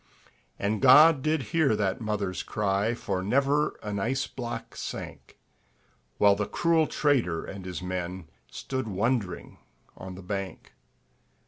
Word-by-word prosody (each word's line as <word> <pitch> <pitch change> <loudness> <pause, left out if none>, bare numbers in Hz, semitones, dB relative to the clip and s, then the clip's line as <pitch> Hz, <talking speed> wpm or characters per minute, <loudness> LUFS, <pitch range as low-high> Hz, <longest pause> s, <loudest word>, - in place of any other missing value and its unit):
And 105 +1 -1
God 150 +3 +7
did 155 -1 0
hear 155 -9 +3
that 100 0 -1
mother's 105 -4 -2
cry, 105 +2 0
For 95 -5 -3
never 140 +8 +1
an 105 -1 -3
ice 130 +6 0
block 120 -2 -6
sank; - - -7 0.8
While 100 -1 +5
the 105 0 -2
cruel 165 -2 +2
trader 120 - +1
and 95 -2 -8
his 90 0 -5
men 90 -1 -4 0.2
Stood 130 -3 -4
wondering 105 0 -2 0.4
on 95 0 -8
the 95 - -10
bank. 95 0 -5
105 Hz, 130 wpm, -27 LUFS, 95-135 Hz, 0.8 s, God